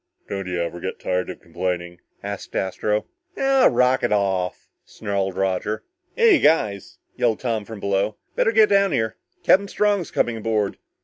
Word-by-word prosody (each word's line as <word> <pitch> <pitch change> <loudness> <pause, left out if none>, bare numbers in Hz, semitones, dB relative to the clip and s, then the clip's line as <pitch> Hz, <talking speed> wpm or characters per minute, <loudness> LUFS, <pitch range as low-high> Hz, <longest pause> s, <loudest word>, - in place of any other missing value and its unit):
"Don't 95 -2 -4
you 90 -1 -2
ever 85 0 -3
get 95 - -5
tired 90 0 -1
of - - -8
complaining?" 85 0 -4 0.2
asked 100 0 -6
Astro. 105 +3 -1 0.3
"Ah 270 -1 +4
rocket 125 -1 +2
off," 95 -3 0 0.2
snarled 100 -3 -3
Roger. 95 +3 -1 0.3
"Hey, 460 -6 +6
you - - -4
guys," 105 - +1 0.2
yelled 115 -3 +1
Tom 115 -4 -1
from 110 -1 -8
below, 100 +1 0 0.2
"better 225 - +3
get 220 -1 +5
down 200 -1 +3
here! 110 -1 -1 0.3
Captain 200 +2 +4
Strong's 205 -4 +1
coming 115 -1 0
aboard." 110 -2 -1
105 Hz, 160 wpm, -23 LUFS, 95-130 Hz, 0.3 s, Hey